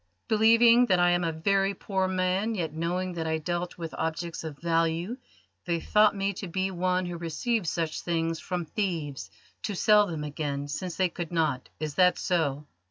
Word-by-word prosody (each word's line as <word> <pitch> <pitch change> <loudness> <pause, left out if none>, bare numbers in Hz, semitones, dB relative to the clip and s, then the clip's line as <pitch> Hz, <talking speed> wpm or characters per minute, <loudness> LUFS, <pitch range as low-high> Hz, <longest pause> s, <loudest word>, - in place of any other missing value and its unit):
"Believing 230 +2 +6
that 185 - +4
I 175 0 +4
am 175 0 +2
a 165 - 0
very 195 +4 +1
poor 190 0 -1
man, 185 +4 0
yet 165 -5 -3
knowing 175 +3 -2
that 165 -2 -3
I 160 0 0
dealt 175 +3 -3
with 165 -2 -6
objects 165 +1 -3
of 155 -3 -6
value, 165 - 0 0.5
they 170 -2 0
thought 210 +4 +4
me 195 0 -1
to 195 +1 -6
be 190 +2 -1
one 185 0 0
who 175 -1 -5
receives 175 +4 -1
such 165 -1 -2
things 165 -1 -1
from 180 -2 -3
thieves 160 -7 -3 0.3
to 205 - -3
sell 210 +1 +5
them 160 -4 -4
again, 145 -1 -3
since 170 +4 -4
they 185 -1 +2
could 170 -1 -6
not. 155 -6 0
Is 155 -1 -3
that 180 +3 +4
so?" 150 -5 0
175 Hz, 185 wpm, -28 LUFS, 160-190 Hz, 0.5 s, Believing